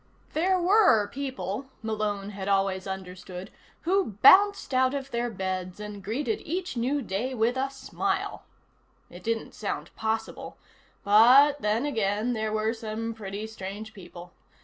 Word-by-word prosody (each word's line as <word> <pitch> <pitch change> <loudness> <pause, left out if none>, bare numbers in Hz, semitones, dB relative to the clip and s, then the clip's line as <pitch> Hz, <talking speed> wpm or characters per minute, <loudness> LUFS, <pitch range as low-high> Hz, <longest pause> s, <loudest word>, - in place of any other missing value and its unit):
There 370 +4 +2
were 360 - +5
people, 265 -3 -4 0.2
Malone 210 -2 -2
had 195 -1 -6
always 195 -1 +1
understood, 185 -1 -7 0.3
who 370 - +1
bounced 405 -5 +7
out 260 +1 +3
of 275 -1 -5
their 240 +1 -1
beds 185 -2 -4
and 210 -1 -7
greeted 290 - -2
each 355 -1 -4
new 260 +4 0
day 230 +6 -2
with 235 +2 +1
a 265 +1 0
smile. 270 -1 -3 0.7
It 175 +1 -11
didn't 225 0 -2
sound 205 - -5
possible, 220 0 -3 0.5
but 255 +8 +6
then 215 +5 +1
again 220 -3 0
there 220 -1 -2
were 215 +1 0
some 225 0 -4
pretty 205 -1 -6
strange 215 0 -7
people. 175 -2 -12
220 Hz, 140 wpm, -27 LUFS, 200-265 Hz, 0.7 s, bounced